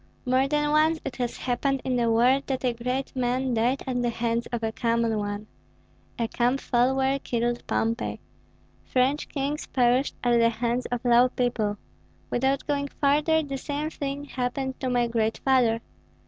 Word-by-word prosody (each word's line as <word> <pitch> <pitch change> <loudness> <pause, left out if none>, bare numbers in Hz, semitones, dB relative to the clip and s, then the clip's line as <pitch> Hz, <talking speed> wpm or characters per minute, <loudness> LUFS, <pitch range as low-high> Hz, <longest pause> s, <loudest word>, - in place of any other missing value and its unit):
More 255 +2 +3
than 295 +1 +1
once 315 +1 +3
it - - -5
has 245 -2 -2
happened 270 +2 0
in 255 - 0
the 235 -1 +2
world 250 +4 +3
that 265 -1 -2
a 245 - +2
great 250 +4 -3
man 255 0 0
died 240 +4 +1
at 250 -2 -1
the 240 - +1
hands 235 0 -1
of 240 -2 -4
a 220 - 0
common 230 -1 0
one. 205 0 -4 0.7
A 230 - 0
camp 245 +4 +1
follower 265 +2 +1
killed 240 -1 -1
Pompey; 230 +2 -1 0.6
French 265 +4 0
kings 285 +1 -3
perished 250 +2 +2
at 240 -1 +3
the 230 0 +5
hands 235 +2 -1
of 245 0 -4
low 245 +1 +5
people. 230 -5 -1 0.5
Without 265 +2 +1
going 285 -1 -1
farther, 300 +3 +3
the 275 -2 -5
same 295 +3 -3
thing 280 -1 -4
happened 260 0 -3
to 260 - -2
my 245 -1 +2
great 225 -1 0
father. 245 -4 +3
250 Hz, 170 wpm, -26 LUFS, 235-275 Hz, 0.7 s, the